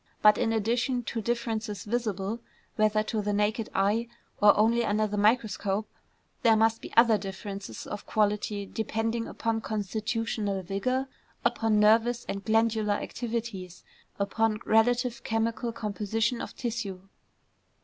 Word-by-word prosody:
But 210 0 +7
in 225 - +1
addition 240 +3 0
to 230 0 -3
differences 225 -3 -2
visible 215 -2 -2 0.4
whether 215 0 +3
to 215 0 -2
the 205 0 -1
naked 210 +2 0
eye, 210 +4 +2 0.3
or 205 0 +7
only 230 +3 +3
under 215 0 +1
the 210 0 -3
microscope, 210 -1 +1 0.5
there 230 -3 +5
must 225 +1 +2
be - - -9
other 230 -2 +6
differences 195 - -6
of 205 - -7
quality 210 -1 0
depending 225 +2 -2
upon 225 -1 -2
constitutional 215 -1 -2
vigor, 255 +9 -1 0.4
upon 220 -2 +2
nervous 225 +3 +4
and 195 0 -4
glandular 220 -1 +2
activities, 220 -7 -5 0.3
upon 215 +2 0
relative 240 +2 +2
chemical 230 +1 -1
composition 220 +2 -1
of - - -7
tissue. 225 -6 -4
220 Hz, 130 wpm, -28 LUFS, 205-230 Hz, 0.5 s, But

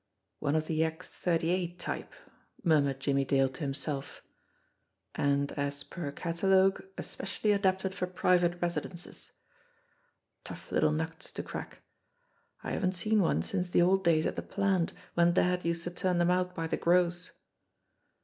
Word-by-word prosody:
"One 145 0 0
of 155 0 +1
the 160 0 +1
X 160 +2 -4
38 175 +1 0
type," - - -4 0.5
murmured 145 -6 +3
Jimmie 135 0 +1
Dale 135 0 +2
to 130 - -11
himself; 140 0 -4 0.9
"and, 140 0 +1
as 140 0 -3
per 150 -3 -5
catalogue, 190 +5 +2
especially 200 +2 -2
adapted 190 -1 +1
for 180 -1 -2
pri 180 0 +2
vate 175 0 0
residences. 175 0 -5 1.1
Tough - - -9
little 155 - +3
nuts 160 +1 -3
to - - -4
crack! - - -7 0.8
I - - -4
haven't 185 -1 0
seen 215 +4 +2
one 85 - +2
since 180 - -2
the 175 - +4
old 190 +2 +3
days 160 -3 +3
at - - -1
the - - -3
plant 195 -4 0 0.2
when 170 0 +4
dad 180 0 +2
used 170 0 -1
to 175 - -3
turn 180 0 0
them 175 +1 +3
out 180 0 0
by 165 - -2
the 160 - -1
gross 175 0 +2
175 Hz, 155 wpm, -30 LUFS, 155-180 Hz, 1.1 s, the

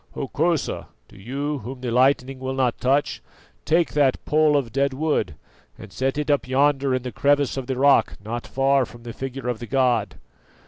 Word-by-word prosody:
Hokosa, 155 +4 -1 0.2
do - - -18
you, 140 +8 -4
whom 125 +3 -8
the 125 -2 -3
lightning 130 +1 +2
will 130 0 -4
not 125 -3 0
touch, 135 +4 +1 0.4
take 165 +1 +2
that 140 -3 +1
pole 155 -1 +3
of 125 -5 -2
dead 140 0 +1
wood 135 - -1 0.4
and - - -12
set 135 +2 -1
it 150 0 0
up 145 -3 +1
yonder 135 0 +2
in 130 - -3
the 125 - -5
crevice 140 +4 +1
of 135 -2 -5
the 130 -2 -2
rock 140 +1 +3
not 120 +2 -5
far 135 0 +2
from 120 -1 -11
the 120 -1 -7
figure 135 0 -6
of 120 -3 -2
the 120 - -7
god." 130 -2 +1
135 Hz, 190 wpm, -23 LUFS, 125-145 Hz, 0.4 s, pole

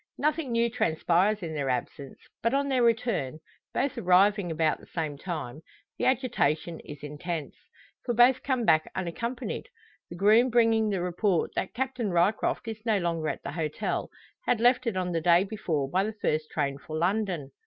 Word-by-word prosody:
Nothing 300 -2 0
new 230 0 +2
transpires 190 0 +1
in 160 -2 -4
their 140 -3 -2
absence; 135 +2 -4 0.2
but 230 +4 +1
on 280 0 +1
their 260 -2 +2
return 230 - +1 0.3
both 280 -2 -1
arriving 190 +1 +4
about 160 -1 +1
the - - -16
same 155 -4 -3
time 150 -4 -6 0.4
the - - 0
agitation 175 - 0
is 145 -1 -11
intense. 150 +2 -5 0.5
For 240 - -1
both 245 +2 +5
come 255 -4 0
back 155 -4 +3
unaccompanied; 235 - -4 0.4
the 170 - -8
groom 215 +6 +5
bringing 225 -2 +3
the 195 -3 -1
report 180 0 0
that - - -3
Captain 255 -3 -2
Ryecroft 185 +6 +1
is 220 -1 -6
no 220 -3 +2
longer 165 -4 -1
at - - -5
the - - -4
hotel 155 -1 -2 0.4
had 240 - +2
left 245 +1 +3
it 215 -5 -1
on 180 -1 -1
the 165 -1 -1
day 175 +2 +5
before 185 -9 -2
by 185 +7 +1
the 215 +2 -3
first 155 -7 -1
train 140 -2 -2
for 155 +2 -6
London! 175 -5 -1
190 Hz, 175 wpm, -28 LUFS, 160-230 Hz, 0.5 s, both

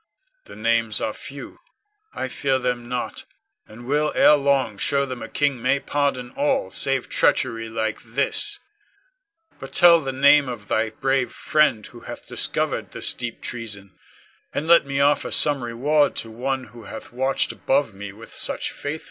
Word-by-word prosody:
The - - -12
names 115 -1 +1
are 110 - -2
few; 140 +5 -10 0.5
I - - -4
fear 135 0 0
them 125 -2 -3
not, 125 -1 -4 0.4
and 115 +3 -12
will 150 +3 +1
ere - - +7
long 140 -7 +1
show 140 -1 +2
them 130 -2 -6
a - - -7
king 140 -4 0
may 130 +3 +2
pardon 140 -4 -1
all 280 -1 0
save 135 -2 0
treachery 115 -3 +1
like 110 -1 -2
this. 140 - 0 1.0
But 135 - -9
tell 170 -1 +7
the 135 -4 -4
name 140 +1 +5
of 110 -4 -8
thy 110 0 +1
brave 135 +3 0
friend 150 -8 +1
who - - -12
hath - - -10
discovered - - -2
this - - +1
deep 120 -2 -6
treason, 105 -5 -6 0.6
and 150 - -3
let 170 -4 +6
me 140 0 -1
offer 145 +1 +2
some 145 -4 +3
reward 140 +5 +1
to 115 - -4
one 130 +3 -2
who 115 -3 -12
hath 110 - -9
watched 130 +2 0
above 135 -5 0
me 100 +1 -8
with 110 +3 -13
such - - -1
faithful 145 - -6
care. 155 +2 -3
130 Hz, 170 wpm, -23 LUFS, 115-140 Hz, 1.0 s, ere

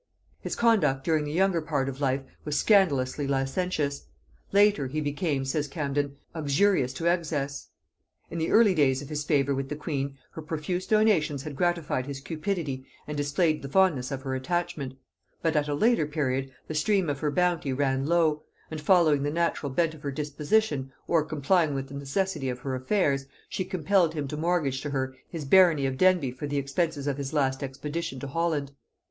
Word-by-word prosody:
His - - -4
conduct 165 - +3
during 155 -1 +1
the 145 - -4
younger 180 0 +2
part 145 -4 -1
of 135 +1 -5
life 135 0 +1 0.2
was 150 -1 -1
scandalously 145 -10 +3
licentious: 140 +1 -1 0.4
latterly 200 -9 +3
he 155 - 0
became, 145 -1 -1
says 145 +2 -1
Camden, 140 -1 -2 0.2
uxorious 155 -1 +2
to 165 - -5
excess. 150 -5 -1 0.6
In 170 - -3
the 160 - 0
early 220 -3 +5
days 140 -4 +2
of 140 - -10
his 150 -1 -2
favor 140 -2 +2
with 135 0 -3
the 150 - -3
queen, 140 -3 -3
her 160 - -7
profuse 160 +4 -3
donations 175 -11 +2
had 150 -2 -6
gratified 170 -6 0
his 140 -1 -5
cupidity 155 -3 -3 0.2
and 150 - -5
displayed 150 +2 +1
the 140 - -6
fondness 150 -7 +3
of 135 -1 -4
her 135 -1 -3
attachment; 150 -1 -2 0.5
but 165 -1 +1
at 150 -1 +2
a 145 - -1
later 215 -2 +3
period 135 -3 -1 0.2
the - - -4
stream 185 +4 +2
of 145 -1 -2
her 150 - 0
bounty 170 -2 +1
ran 135 0 0
low; 160 -3 +2 0.3
and 155 -1 -5
following 155 -4 +4
the 145 - 0
natural 165 -2 0
bent 160 +3 +1
of 155 - -13
her 140 - -3
disposition, 145 +1 0 0.2
or 165 -3 +3
complying 155 +1 +1
with 135 0 -4
the - - -10
necessity 140 +1 -2
of 125 -1 -5
her 135 0 -3
affairs, 135 0 0 0.2
she 185 - -2
compelled 185 -2 +1
him 145 -2 -2
to 150 - -5
mortgage 155 -5 0
to 145 - -4
her 130 -2 -2
his 160 -4 -5
barony 165 -2 +5
of 135 -1 -1
Denbigh 175 -6 +3
for 145 +3 -5
the 145 0 -2
expenses 140 +1 -1
of 140 -2 -1
his 140 +1 -4
last 135 -3 +1
expedition 145 +2 -4
to 140 - -6
Holland. 150 -1 -1
150 Hz, 190 wpm, -27 LUFS, 135-170 Hz, 0.6 s, early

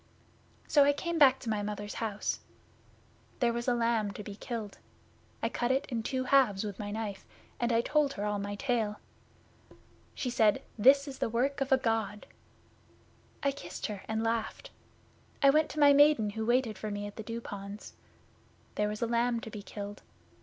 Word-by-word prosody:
'So 285 -1 +5
came 340 +3 -3
I - - 0
back 265 -3 +7
to 235 - -5
my 210 -1 0
Mother's 205 0 -4
house. 210 -2 -2 1.0
There 235 -1 +2
was 235 +1 -3
a 245 - +3
lamb 230 -3 +1
to 210 - -7
be 200 0 -8
killed. 220 -2 -6 0.6
I - - +2
cut 240 - -1
it 265 +2 +1
in 235 -4 -1
two 255 +3 -2
halves 255 -7 +3
with 205 -2 -5
my 205 -1 -4
knife, 210 -2 -4 0.4
and 240 0 +1
I 230 0 +3
told 290 +2 +1
her 205 - -3
all 210 -1 -1
my 205 0 -4
tale. 225 -3 -1 1.2
She 250 - -2
said, 220 -3 +3
"This 275 +6 +5
is 270 -1 -7
the - - 0
work 265 +5 0
of 275 +1 -1
a 265 - +7
God." 225 -4 -1 1.2
I 280 - +3
kissed 185 -10 -7
her 205 -3 -4
and 220 0 -1
laughed. 230 - -2 0.7
I 275 - +8
went 305 +2 +3
to 310 - -5
my 285 -1 +7
Maiden 285 -7 +5
who 220 +1 -4
waited 240 -4 +1
for 215 - -4
me 205 0 -4
at 205 - -8
the - - -6
Dew 230 +2 -5
ponds. 205 -2 -8 0.8
There 210 0 0
was 210 +2 -3
a - - +3
lamb 235 0 +1
to 225 - -8
be 210 - -7
killed. 205 0 -7
230 Hz, 190 wpm, -31 LUFS, 210-260 Hz, 1.2 s, I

